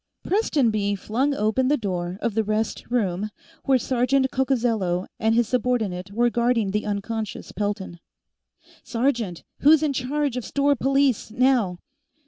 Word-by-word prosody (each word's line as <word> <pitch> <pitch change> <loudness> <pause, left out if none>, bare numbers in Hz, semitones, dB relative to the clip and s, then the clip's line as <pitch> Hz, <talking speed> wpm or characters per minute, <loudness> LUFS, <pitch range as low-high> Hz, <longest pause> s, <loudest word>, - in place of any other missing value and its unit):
Prestonby 230 - +1
flung 260 +9 0
open 220 +4 +1
the 295 +2 +3
door 180 -4 -3
of 235 - 0
the 220 +1 +1
rest 215 +2 -2
room 210 -4 0 0.4
where 270 -2 +4
Sergeant 260 +2 +1
Coccozello 230 -9 0
and 220 0 +2
his 235 -1 +3
subordinate 220 -7 -1
were 240 +3 +2
guarding 235 -4 +1
the 210 +1 -2
unconscious 210 +1 -4
Pelton. 200 -3 -3 0.8
"Sergeant! 230 -8 -1 0.2
Who's 310 +2 +5
in 295 -2 +1
charge 270 0 -1
of 250 - -3
store 280 +3 +1
police, 270 -2 +1
now?" 240 -6 +2
230 Hz, 135 wpm, -24 LUFS, 205-265 Hz, 0.8 s, Who's